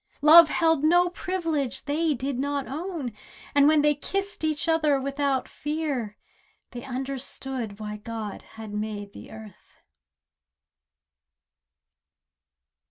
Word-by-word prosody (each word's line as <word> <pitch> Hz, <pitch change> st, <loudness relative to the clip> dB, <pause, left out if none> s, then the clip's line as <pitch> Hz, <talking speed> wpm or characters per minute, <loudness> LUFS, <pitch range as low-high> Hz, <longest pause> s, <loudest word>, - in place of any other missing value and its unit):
Love 320 Hz, +1 st, +9 dB
held 325 Hz, -3 st, +2 dB
no 350 Hz, +3 st, +4 dB
privilege 330 Hz, -8 st, -2 dB
they 305 Hz, +1 st, +1 dB
did 260 Hz, +1 st, -3 dB
not 280 Hz, 0 st, -1 dB
own, 305 Hz, -, -5 dB, 0.4 s
And 285 Hz, 0 st, +5 dB
when 305 Hz, -1 st, +4 dB
they 295 Hz, 0 st, +4 dB
kissed 390 Hz, +6 st, -4 dB
each 310 Hz, +1 st, 0 dB
other 310 Hz, -4 st, +3 dB
without 275 Hz, 0 st, -1 dB
fear, 290 Hz, -8 st, -3 dB, 0.5 s
They 245 Hz, -1 st, -7 dB
understood 260 Hz, -4 st, -4 dB
why 210 Hz, 0 st, -5 dB
God 220 Hz, -1 st, -6 dB, 0.2 s
had 220 Hz, -2 st, -8 dB
made 210 Hz, -1 st, -4 dB
the -, -, -11 dB
earth. 220 Hz, -3 st, -14 dB
280 Hz, 110 wpm, -26 LUFS, 240-315 Hz, 0.5 s, Love